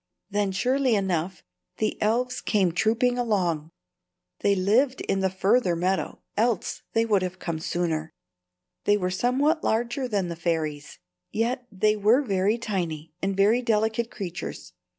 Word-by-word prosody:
Then, 205 -1 +1
surely 255 +5 +2
enough, 185 -2 -1 0.3
the 215 - -1
elves 250 +4 +1
came 195 -5 +2
trooping 230 +7 +1
along. 180 -10 0 0.7
They 200 - +3
lived 230 +8 +2
in 195 - 0
the 190 0 +2
further 190 0 +2
meadow, 185 +3 -1
else 225 -2 0
they 225 0 +3
had 185 -4 0
come 170 -3 -4
sooner. 160 -2 -2 0.7
They 205 0 +4
were 180 -2 -1
somewhat 270 - +1
larger 240 +4 0
than 200 -6 0
the 170 - -4
fairies, 160 -4 -2 0.3
yet 245 +3 -1
they 210 +2 +2
were 215 +7 +4
very 200 -1 +1
tiny 170 -9 -3
and 195 0 -1
very 215 +5 +4
delicate 225 0 +1
creatures. 180 - -6
205 Hz, 140 wpm, -26 LUFS, 180-235 Hz, 0.7 s, They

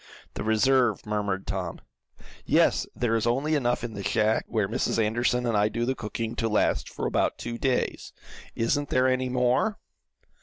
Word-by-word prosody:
"The - - -4
reserve," 115 +1 +2
murmured 105 -2 -2
Tom. 95 -4 -4 0.6
"Yes, - - +3
there 115 -2 0
is 115 +1 0
only 135 +6 +1
enough 125 -6 +1
in 120 -2 -4
the 100 - -6
shack 110 +2 +1
where 110 -4 0
Mrs. 115 +3 -1
Anderson 120 +3 +1
and 115 -2 0
I 105 +1 +3
do 120 +2 -2
the 130 - 0
cooking, 115 -1 -4
to 115 - 0
last 105 - +1
for - - -5
about - - 0
two 120 0 -5
days. 130 -2 -1 0.4
Isn't 145 +5 0
there 130 0 +3
any 130 0 +1
more?" 125 - +1
115 Hz, 175 wpm, -26 LUFS, 110-125 Hz, 0.6 s, Yes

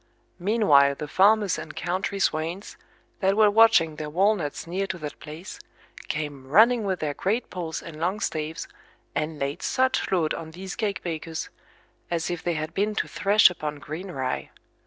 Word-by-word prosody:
Meanwhile 170 -9 +4
the 150 - -6
farmers 205 +3 +3
and - - -8
country 185 +3 -2
swains, 170 +2 -1 0.4
that 195 +1 +2
were 215 -1 +6
watching 215 -8 +5
their 150 -1 -4
walnuts 180 -2 +1
near 190 +4 -2
to 190 - -4
that 150 -3 -7
place, 155 +5 -9 0.5
came 145 -3 -4
running 220 - +5
with 190 -2 -1
their 150 -2 -1
great 215 - -1
poles 170 -4 -4
and 155 -2 -9
long 180 +5 -1
staves, 160 -5 -3 0.5
and 155 0 -2
laid 140 +5 -3
such 260 0 +1
load 170 -5 +2
on 160 -1 -6
these 185 +4 -7
cake 210 -3 -2
bakers, 165 -1 -4 0.6
as 170 0 -1
if 175 -2 -3
they 170 0 -1
had 155 +1 -4
been 210 +2 0
to - - -1
thresh 205 -1 +5
upon 150 -4 -4
green 160 +6 -7
rye. 130 -6 -3
175 Hz, 170 wpm, -25 LUFS, 155-200 Hz, 0.6 s, were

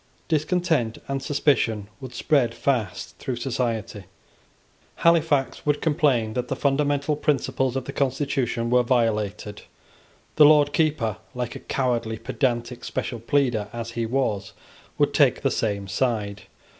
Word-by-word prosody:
Discontent 160 -6 +1
and 135 -1 -2
suspicion 135 -7 +1
would 130 -2 -9
spread 125 -7 +2
fast 120 -9 -2
through 130 - -3
society. 115 -5 -3 0.9
Halifax 160 -5 +2
would 145 0 +1
complain 145 -9 +1
that 125 +1 -2
the - - -2
fundamental 145 +1 +1
principles 135 -3 0
of 135 -1 -2
the - - -6
constitution 130 -4 -1
were 125 0 +5
violated. 110 -4 -1 0.8
The 150 - +9
Lord 145 -1 +5
Keeper, 140 -10 +1 0.2
like 125 -1 -3
a - - -6
cowardly 120 -4 -1
pedantic 120 -1 -2
special 120 - -3
pleader 120 -3 +1
as 115 -1 -5
he 115 -1 -2
was, 110 -5 -1 0.4
would - - +2
take - - +3
the - - +2
same 100 -3 -1
side. 105 -1 -1
125 Hz, 130 wpm, -24 LUFS, 115-145 Hz, 0.9 s, The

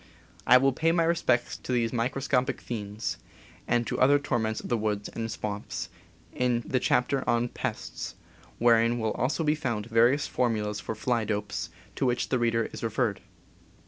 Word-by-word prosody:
I 125 - +9
will 135 +1 +3
pay 165 +5 +2
my 170 0 +3
respects 145 -7 +1
to - - -7
these 120 -2 +1
microscopic 130 +2 0
fiends, 105 -2 -4 0.5
and 120 0 +2
to - - -3
other 140 +3 +6
torments 120 -6 -1
of - - -7
the 120 - +1
woods 105 -1 -2
and 115 0 -4
swamps, 105 0 -4 0.4
in 120 -1 +1
the 130 - +1
chap 125 0 +2
ter 135 -2 0
on 120 0 +2
Pests, - - -5 0.4
wherein 115 0 +4
will 110 -2 0
also 145 +6 0
be 150 -1 +3
found 120 -9 -2
various 120 +5 +3
for 125 -1 +1
mulas 105 -2 -2
for 110 - -4
fly 120 +1 0
dopes, 105 -1 -3 0.3
to 130 - +1
which 125 0 0
the 130 - +1
reader 115 -1 +1
is - - -7
referred. 115 -3 -1
120 Hz, 175 wpm, -28 LUFS, 110-130 Hz, 0.5 s, I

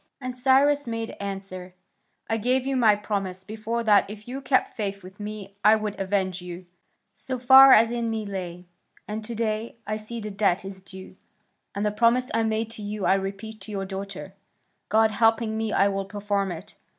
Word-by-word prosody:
And 255 -2 -5
Cyrus 275 +2 +3
made 230 -1 -3
answer: 195 -2 -6 0.5
"I 225 - 0
gave 250 +4 +1
you 270 0 -1
my 225 -5 +5
promise 195 -3 -3
before 220 +3 -3
that 205 -3 +4
if 210 +1 -10
you 265 +3 -5
kept 265 -1 +1
faith 200 -3 -3
with 190 +3 -13
me 205 -1 -7
I 215 +1 +7
would 215 -2 -3
avenge 190 -2 -1
you, 180 0 -8 0.5
so 255 +6 -4
far 265 +2 +9
as 225 -1 +6
in 235 -1 -1
me 220 -1 -3
lay, 180 -3 -6 0.4
and 215 +1 -4
to 230 +2 -6
day 220 0 -2
I 215 +1 -2
see 220 +2 -7
the 215 -1 -6
debt 195 -2 +1
is 190 -1 -8
due, 190 0 -12 0.6
and 200 +1 -1
the 210 - +1
promise 235 +4 +2
I 230 - +2
made 220 0 -1
to 225 - -8
you 205 -1 -4
I - - +5
repeat 195 +2 -4
to 195 - -9
your 195 -1 -3
daughter; 195 0 -7 0.6
God 220 +1 +4
helping 225 +1 +2
me, 220 -1 -2
I 200 - +3
will 195 -1 -2
perform 200 -1 -2
it. 165 - -9
215 Hz, 195 wpm, -25 LUFS, 195-230 Hz, 0.6 s, far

